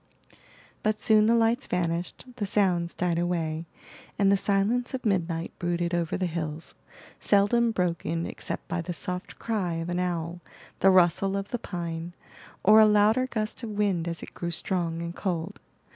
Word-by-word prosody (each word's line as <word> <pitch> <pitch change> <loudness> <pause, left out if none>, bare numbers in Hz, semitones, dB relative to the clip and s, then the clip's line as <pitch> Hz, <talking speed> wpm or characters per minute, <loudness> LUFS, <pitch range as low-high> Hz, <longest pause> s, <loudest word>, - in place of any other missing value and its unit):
But 215 0 0
soon 215 -2 +4
the 230 - +4
lights 230 +1 +2
vanished, 175 +2 -2
the 205 - -1
sounds 180 -4 +1
died 175 -2 0
away, 165 -2 -2 0.5
and 200 -1 +4
the - - +5
silence 210 +7 +1
of 260 - -7
midnight 170 -5 -1
brooded 175 0 -1
over 170 -2 0
the 185 - -1
hills, 160 -2 -4 0.5
seldom 215 +4 +3
broken 170 -4 -1
except - - -5
by 175 0 -2
the 175 +1 -4
soft 180 +5 -5
cry 200 -7 -2
of 165 +1 -4
an 175 0 -1
owl, 175 -1 -2 0.4
the 195 - +5
rustle 190 +1 +4
of 200 +1 -4
the 245 - -3
pine, 170 -4 -5 0.5
or 215 +2 +7
a 215 - +8
louder 215 +4 +4
gust 215 -2 -3
of 230 - -5
wind 200 -5 0
as 170 -1 -4
it - - -10
grew 170 - -4
strong 170 -1 -1
and 170 +1 -6
cold. 175 -4 -3
180 Hz, 170 wpm, -27 LUFS, 170-210 Hz, 0.5 s, a